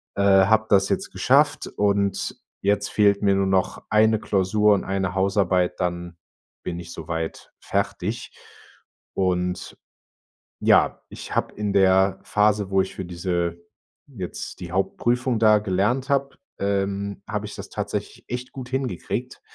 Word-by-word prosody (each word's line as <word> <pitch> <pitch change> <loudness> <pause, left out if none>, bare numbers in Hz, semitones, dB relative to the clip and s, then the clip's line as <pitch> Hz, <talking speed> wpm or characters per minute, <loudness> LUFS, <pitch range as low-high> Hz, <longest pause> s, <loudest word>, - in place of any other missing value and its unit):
Äh, 100 - 0
habe 100 +3 +5
das 100 -1 +4
jetzt - - -1
geschafft, - - +2
und 100 -1 0 0.3
jetzt 100 0 +1
fehlt 100 -1 +3
mir 100 -1 +3
nur 95 0 +1
noch 95 -1 0
1 110 +1 +4
Klausur 105 0 +2
und 100 - -2
1 95 -1 -1
Hausarbeit, 95 -2 +1
dann 85 -1 -3 0.5
bin 85 -1 -4
ich 85 -1 -9
so 80 -2 -9
weit 80 -1 -5
fertig. - - -2 0.8
Und, 90 -1 -1 0.8
ja, - - +3
ich - - -8
habe - - 0
in 105 -1 -2
der 95 0 +4
Phase, 105 -1 +2
wo 95 0 +3
ich 95 - -5
für 95 - -5
diese 85 -1 -2 0.5
jetzt 100 -11 -7
die 90 -1 -7
Hauptprüfung 120 +6 0
da 110 -1 +5
gelernt 105 +7 0
habe, 140 0 0 0.2
ähm, 100 0 -1
habe - - -3
ich - - -8
das - - -8
tatsächlich - - -5
echt 125 +1 -5
gut 130 -3 -8
hingekriegt. 130 -8 -3
100 Hz, 145 wpm, -24 LUFS, 95-105 Hz, 0.8 s, habe